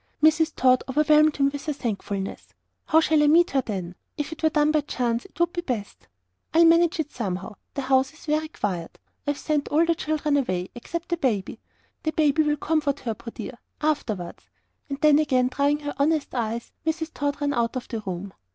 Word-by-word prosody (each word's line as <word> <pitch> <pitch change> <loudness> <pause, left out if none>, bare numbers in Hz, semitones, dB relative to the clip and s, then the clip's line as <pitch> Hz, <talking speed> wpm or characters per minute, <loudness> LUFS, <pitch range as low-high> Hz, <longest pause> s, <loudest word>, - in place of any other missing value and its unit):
Mrs. 315 0 +4
Tod 255 0 +4
overwhelmed 305 +2 +4
him 275 -1 +3
with 285 0 -5
thankfulness. 205 -9 -4 0.3
"How 320 - +5
shall 315 -1 +3
I 295 - +4
meet 335 +3 +5
her, 270 - +2
then? 185 -7 -5 0.2
If 295 +1 -3
it 320 - -8
were 320 - +4
done 300 -1 +3
by 305 -1 +2
chance 245 -4 -2
it - - -17
would 345 0 +2
be 345 - -2
best." 235 -11 -5 0.5
"I'll 335 +1 +7
manage 335 0 +4
it 295 -2 -2
somehow. 195 -3 -4 0.2
The 280 - -2
house 265 +1 +2
is 315 - -16
very 310 0 0
quiet: 185 - -4 0.3
I've 290 -1 0
sent 300 -2 -1
all 320 +3 +3
the 335 - +3
children 305 -2 0
away, 185 -9 -1
except 335 +8 -6
the 345 - 0
baby. 225 - -1 0.4
The 315 - -2
baby'll 300 0 +2
comfort 300 -3 0
her, 230 - -2
poor 235 +2 -9
dear! 235 +2 -8 0.2
afterwards." 225 - -2 0.4
And, 290 +1 +4
again 255 -4 +2
drying 285 +3 +1
her 290 0 -4
honest 300 +1 +1
eyes, 235 -1 -3
Mrs. 320 0 -2
Tod 285 0 -2
ran 285 -1 0
out 235 0 0
of 255 - -4
the 230 - -4
room. 190 -1 -6
285 Hz, 195 wpm, -25 LUFS, 235-310 Hz, 0.5 s, I'll